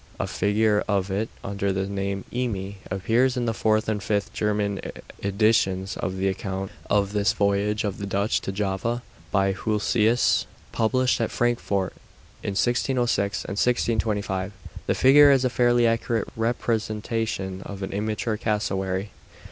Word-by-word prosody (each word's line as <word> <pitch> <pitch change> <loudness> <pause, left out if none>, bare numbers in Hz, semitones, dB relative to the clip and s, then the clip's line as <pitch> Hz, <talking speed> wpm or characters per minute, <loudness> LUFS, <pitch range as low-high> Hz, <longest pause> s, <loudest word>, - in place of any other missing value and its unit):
A - - 0
figure 105 0 +2
of 100 -2 0
it, 105 +4 -1
under 100 0 -1
the 95 0 -1
name 100 -1 -3
'eme,' 100 -6 -2
appears 115 +7 +1
in 120 - 0
the 115 - 0
fourth 110 0 +1
and 105 -2 -1
fifth 100 +1 -1
German 105 -1 0 0.4
editions 100 -1 +2
of 95 +2 -3
the 95 +1 0
account 95 0 -3 0.2
of 100 -1 +2
this 105 +1 +2
voyage 100 +2 +1
of 100 -2 -3
the 100 - -4
Dutch 100 +2 0
to - - -3
Java, 105 +5 -2 0.3
by 95 -1 +3
Hulsius, 110 +3 +2 0.2
published 125 +2 +1
at 115 - 0
Frankfort 110 -6 0 0.5
in 100 -1 -3
1606 120 -5 +1
and 100 - -5
1625. 105 -5 0 0.3
The - - +2
figure 145 +2 +7
is 135 -2 +4
a 125 - +1
fairly 120 -1 +3
accurate 115 -1 0
representation 110 -4 -2
of 100 0 -7
an 95 - -4
immature 110 +2 -1
cassowary. 100 -3 -1
105 Hz, 145 wpm, -25 LUFS, 100-115 Hz, 0.5 s, figure